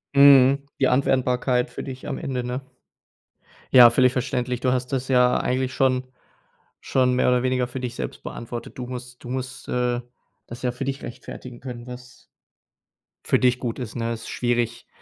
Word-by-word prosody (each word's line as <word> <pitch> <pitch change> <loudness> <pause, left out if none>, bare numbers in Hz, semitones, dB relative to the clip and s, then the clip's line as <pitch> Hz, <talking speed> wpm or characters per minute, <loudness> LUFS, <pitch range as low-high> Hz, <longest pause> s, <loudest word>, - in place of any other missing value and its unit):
Mhm. 140 0 +7
Die 135 - +4
Anwendbarkeit 125 -1 +1
für - - -7
dich 130 -1 -8
am - - -3
Ende, 125 -2 -3
ne? 125 +2 -3 1.1
Ja, 120 -2 +10
völlig 125 +1 +4
verständlich. 125 -1 -2
Du 125 0 +1
hast 125 +1 -2
das 130 -1 -2
ja 125 -1 +4
eigentlich 130 0 -1
schon 130 -1 +2 0.8
schon 125 -1 +2
mehr 125 - +3
oder 125 -1 +3
weniger 130 -1 +1
für 130 +1 -6
dich 125 -1 -5
selbst - - -5
beantwortet. 120 +1 -7
Du 125 - -4
musst 125 -1 -8
du 120 - -8
musst, 130 0 -5
äh, 125 0 0 0.5
das 120 - -9
ja 125 - +1
für 130 - -5
dich 135 0 -4
rechtfertigen 120 +1 -9
können, 125 -2 -8
was 125 0 -11 1.0
für - - +3
dich 125 0 +3
gut 120 0 -4
ist, 120 -3 -6
ne? 115 0 -2
Ist 115 - -8
schwierig, 120 -1 -1
125 Hz, 175 wpm, -24 LUFS, 125-130 Hz, 1.1 s, Ja